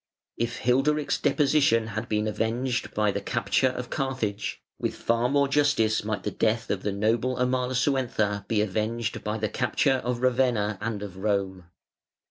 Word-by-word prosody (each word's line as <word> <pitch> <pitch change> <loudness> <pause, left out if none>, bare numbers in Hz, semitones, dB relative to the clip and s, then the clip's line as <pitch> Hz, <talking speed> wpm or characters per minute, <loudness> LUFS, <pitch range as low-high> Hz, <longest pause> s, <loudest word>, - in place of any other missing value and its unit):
If 120 0 -3
Hilderic's 140 +4 +2
deposition 140 -6 +3
had 110 +2 -4
been 105 0 +1
avenged 120 +4 -1
by 105 -1 +2
the - - -3
capture 130 - +1
of 125 -1 -4
Carthage, 115 -7 -2 0.2
with - - -2
far 115 +1 +1
more 140 +1 +3
justice 140 -6 +2
might 105 0 -3
the 105 - -2
death 110 +2 0
of 95 - -1
the 105 - -1
noble 115 +5 +1
Amalasuentha 125 -5 0
be 110 -2 +1
avenged 110 +2 -2
by 105 +1 -2
the 110 0 -1
capture 135 -3 +1
of 120 0 -2
Ravenna 120 -5 +1
and 105 -2 -3
of 95 -3 -8
Rome. 95 -2 -1
115 Hz, 155 wpm, -26 LUFS, 105-130 Hz, 0.2 s, deposition